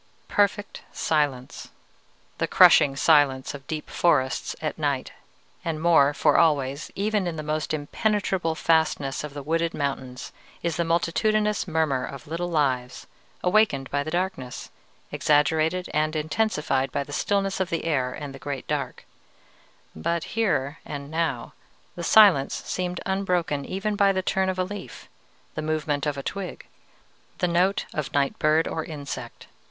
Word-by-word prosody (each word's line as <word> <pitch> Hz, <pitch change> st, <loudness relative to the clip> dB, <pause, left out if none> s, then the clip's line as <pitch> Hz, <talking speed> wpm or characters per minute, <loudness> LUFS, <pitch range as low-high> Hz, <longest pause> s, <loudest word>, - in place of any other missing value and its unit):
"Perfect 205 Hz, 0 st, 0 dB
silence, 145 Hz, -5 st, -1 dB, 0.7 s
the -, -, +1 dB
crushing 135 Hz, -1 st, +6 dB
silence 135 Hz, -2 st, +3 dB
of 135 Hz, -2 st, -10 dB
deep 155 Hz, -1 st, -4 dB
forests 130 Hz, -7 st, +1 dB
at -, -, -4 dB
night; -, -, -1 dB, 0.5 s
and 160 Hz, -2 st, -2 dB
more, 160 Hz, -4 st, +5 dB
for 145 Hz, -, +2 dB
always, 140 Hz, -2 st, +1 dB
even 205 Hz, -1 st, 0 dB
in 170 Hz, -, -3 dB
the 155 Hz, -, -5 dB
most 155 Hz, 0 st, -2 dB
impenetrable 175 Hz, +2 st, -1 dB
fastnesses 160 Hz, -5 st, +1 dB
of 150 Hz, -1 st, -7 dB
the 145 Hz, -, -6 dB
wooded 165 Hz, +2 st, 0 dB
mountains, 130 Hz, -3 st, -4 dB, 0.3 s
is 170 Hz, -1 st, -1 dB
the 170 Hz, -, 0 dB
multitudinous 210 Hz, +6 st, +1 dB
murmur 155 Hz, -6 st, 0 dB
of 140 Hz, +3 st, -7 dB
little 170 Hz, +3 st, -3 dB
lives, 130 Hz, -6 st, -1 dB, 0.4 s
awakened 180 Hz, -9 st, +2 dB
by 145 Hz, -, +1 dB
the 150 Hz, -, -4 dB
darkness, 175 Hz, -7 st, -3 dB, 0.4 s
exaggerated 155 Hz, +4 st, +2 dB
and 155 Hz, +1 st, +1 dB
intensified 150 Hz, -5 st, 0 dB
by -, -, -1 dB
the 145 Hz, -, -10 dB
stillness 195 Hz, +2 st, 0 dB
of 190 Hz, -1 st, 0 dB
the 165 Hz, -2 st, -2 dB
air 130 Hz, -6 st, 0 dB
and 145 Hz, +1 st, -7 dB
the 135 Hz, -, -10 dB
great 140 Hz, -2 st, -5 dB
dark: -, -, -3 dB, 0.9 s
but 165 Hz, -, -1 dB
here 165 Hz, -9 st, 0 dB
and 145 Hz, -1 st, -7 dB
now 160 Hz, -7 st, -2 dB, 0.4 s
the 175 Hz, -, -7 dB
silence 185 Hz, -8 st, +5 dB
seemed 180 Hz, -1 st, -3 dB
unbroken 180 Hz, -7 st, 0 dB
even 200 Hz, +2 st, -2 dB
by 200 Hz, -1 st, +4 dB
the 190 Hz, -1 st, -1 dB
turn 190 Hz, 0 st, +1 dB
of 185 Hz, -, -2 dB
a 185 Hz, -, +1 dB
leaf, 205 Hz, +2 st, -8 dB, 0.5 s
the 155 Hz, -, -4 dB
movement 155 Hz, -2 st, -1 dB
of 145 Hz, -1 st, -1 dB
a 140 Hz, -, -5 dB
twig, 195 Hz, +3 st, -5 dB, 0.7 s
the 180 Hz, -, +1 dB
note 180 Hz, +3 st, +1 dB
of 155 Hz, -3 st, -3 dB
night 140 Hz, -1 st, 0 dB
bird 155 Hz, +1 st, +3 dB
or 160 Hz, -, -3 dB
insect. 140 Hz, -6 st, -7 dB
155 Hz, 150 wpm, -25 LUFS, 140-180 Hz, 0.9 s, crushing